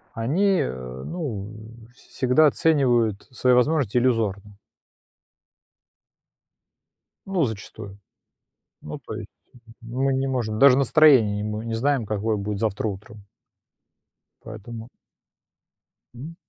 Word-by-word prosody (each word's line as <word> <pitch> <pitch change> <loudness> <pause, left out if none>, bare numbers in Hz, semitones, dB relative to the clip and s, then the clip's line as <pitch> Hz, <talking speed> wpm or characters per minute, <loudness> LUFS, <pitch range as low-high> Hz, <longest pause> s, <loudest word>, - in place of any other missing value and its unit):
они, 175 - +1
э, 65 0 -6
ну, 115 - -5 0.4
всегда 130 +5 +2
оценивают 120 -9 +1
свои 125 0 +1
возможности 125 -2 +2
иллюзорно. 105 -5 0 2.7
Ну, 190 -4 0
зачастую. 105 -3 -7 0.8
Ну, 75 - -7
то - - -9
есть, - - -7 0.6
мы 130 +4 -1
не 135 +1 -1
можем 115 -5 -2
даже 135 -1 +6
настроение 135 -7 +5
не 105 - -3
мо 110 +2 -4
знаем, 130 0 0
какое 105 +1 -1
будет 100 0 -4
завтра 110 0 -2
утром. 105 +1 -9 1.2
Поэтому 110 +1 -9 1.3
Мгм. 150 +8 -9
115 Hz, 100 wpm, -23 LUFS, 105-135 Hz, 2.7 s, даже